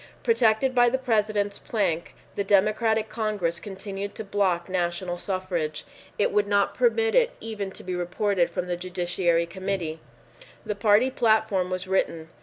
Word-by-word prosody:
Protected 230 Hz, +2 st, +3 dB
by 245 Hz, -1 st, +5 dB
the 260 Hz, -, 0 dB
President's 210 Hz, -5 st, 0 dB
plank, 170 Hz, -7 st, -2 dB, 0.2 s
the 200 Hz, -, -1 dB
Democratic 215 Hz, +3 st, +2 dB
Congress 210 Hz, -7 st, -2 dB
continued 195 Hz, +1 st, -6 dB
to -, -, -5 dB
block 195 Hz, -4 st, 0 dB
national 175 Hz, -1 st, -2 dB
suffrage. 180 Hz, -6 st, -3 dB, 0.3 s
It 205 Hz, -, +2 dB
would 205 Hz, 0 st, +2 dB
not 200 Hz, 0 st, +2 dB
permit 455 Hz, -2 st, +2 dB
it -, -, +3 dB
even 215 Hz, -3 st, -4 dB
to -, -, -11 dB
be 185 Hz, -, -4 dB
reported 180 Hz, +1 st, 0 dB
from 175 Hz, +1 st, -3 dB
the 175 Hz, -1 st, -2 dB
Judiciary 175 Hz, -1 st, 0 dB
Committee. 180 Hz, -3 st, -3 dB, 0.7 s
The 210 Hz, -, -1 dB
party 210 Hz, +5 st, +3 dB
platform 220 Hz, -6 st, +2 dB
was 185 Hz, 0 st, -3 dB
written. 165 Hz, -4 st, -1 dB
200 Hz, 150 wpm, -26 LUFS, 180-220 Hz, 0.7 s, by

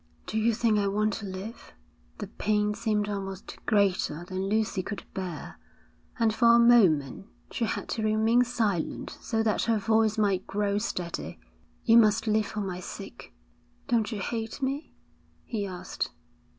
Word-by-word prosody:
'Do 220 Hz, -, -2 dB
you 230 Hz, +2 st, +3 dB
think 220 Hz, -1 st, +2 dB
I 200 Hz, -, +1 dB
want 210 Hz, +2 st, +1 dB
to 205 Hz, -, -6 dB
live?' 195 Hz, +5 st, -8 dB, 0.4 s
The 210 Hz, -, -4 dB
pain 210 Hz, +1 st, 0 dB
seemed 210 Hz, -1 st, 0 dB
almost 195 Hz, -2 st, -5 dB
greater 190 Hz, -5 st, +1 dB
than 190 Hz, +1 st, -3 dB
Lucy 215 Hz, -2 st, +1 dB
could 200 Hz, +3 st, -6 dB
bear, 180 Hz, -4 st, -6 dB, 0.6 s
and 225 Hz, -3 st, +2 dB
for 235 Hz, +1 st, +5 dB
a -, -, +6 dB
moment 195 Hz, -, +4 dB, 0.2 s
she 235 Hz, -, -1 dB
had -, -, -3 dB
to 225 Hz, -, -2 dB
remain 220 Hz, +3 st, +3 dB
silent 215 Hz, -8 st, -2 dB
so 225 Hz, -2 st, 0 dB
that 215 Hz, -1 st, +1 dB
her 230 Hz, -1 st, +2 dB
voice 220 Hz, +1 st, +2 dB
might 200 Hz, -3 st, +1 dB
grow 205 Hz, 0 st, 0 dB
steady. 180 Hz, -6 st, -4 dB, 0.5 s
'You 230 Hz, -, +7 dB
must 220 Hz, 0 st, +3 dB
live 215 Hz, -1 st, +2 dB
for 210 Hz, -, -4 dB
my 185 Hz, -2 st, -4 dB
sake.' 180 Hz, -, -9 dB, 0.6 s
'Don't 230 Hz, -2 st, +2 dB
you 210 Hz, -3 st, -3 dB
hate 225 Hz, +3 st, -3 dB
me?' 275 Hz, +3 st, -3 dB, 0.5 s
he 205 Hz, -3 st, -3 dB
asked. 180 Hz, -1 st, -4 dB
210 Hz, 160 wpm, -28 LUFS, 195-225 Hz, 0.6 s, You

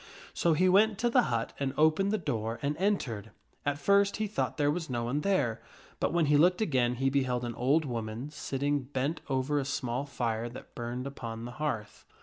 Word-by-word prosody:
So 170 Hz, -, +2 dB
he 185 Hz, +4 st, +3 dB
went 205 Hz, +3 st, +5 dB
to 240 Hz, +2 st, +1 dB
the 250 Hz, -, +6 dB
hut 115 Hz, -2 st, -1 dB
and 140 Hz, -1 st, -1 dB
opened 160 Hz, +6 st, +4 dB
the 215 Hz, -, +2 dB
door 115 Hz, -, -2 dB
and 145 Hz, +1 st, 0 dB
entered. 130 Hz, -, -1 dB, 0.4 s
At 145 Hz, 0 st, +1 dB
first 200 Hz, +6 st, +3 dB
he 215 Hz, -, 0 dB
thought 210 Hz, +1 st, -2 dB
there 145 Hz, -1 st, +3 dB
was 165 Hz, -1 st, -3 dB
no 120 Hz, -2 st, -1 dB
one 130 Hz, +5 st, -1 dB
there, 145 Hz, -, +1 dB, 0.4 s
but -, -, +1 dB
when 170 Hz, -1 st, +2 dB
he 145 Hz, 0 st, +4 dB
looked 180 Hz, +4 st, +4 dB
again 130 Hz, -, +1 dB
he 135 Hz, +2 st, +1 dB
beheld 125 Hz, -3 st, 0 dB
an 120 Hz, -, -3 dB
old 140 Hz, +7 st, +2 dB
woman 115 Hz, +2 st, -4 dB
sitting 145 Hz, -1 st, -1 dB
bent 135 Hz, +4 st, -2 dB
over 135 Hz, +2 st, +1 dB
a -, -, -1 dB
small 130 Hz, 0 st, -2 dB
fire 120 Hz, -3 st, -2 dB
that 120 Hz, -, -11 dB
burned 120 Hz, +2 st, -4 dB
upon 115 Hz, -4 st, -6 dB
the 120 Hz, -, -6 dB
Arthur -, -, -13 dB
hearth. 115 Hz, -9 st, -3 dB
140 Hz, 210 wpm, -30 LUFS, 120-160 Hz, 0.4 s, the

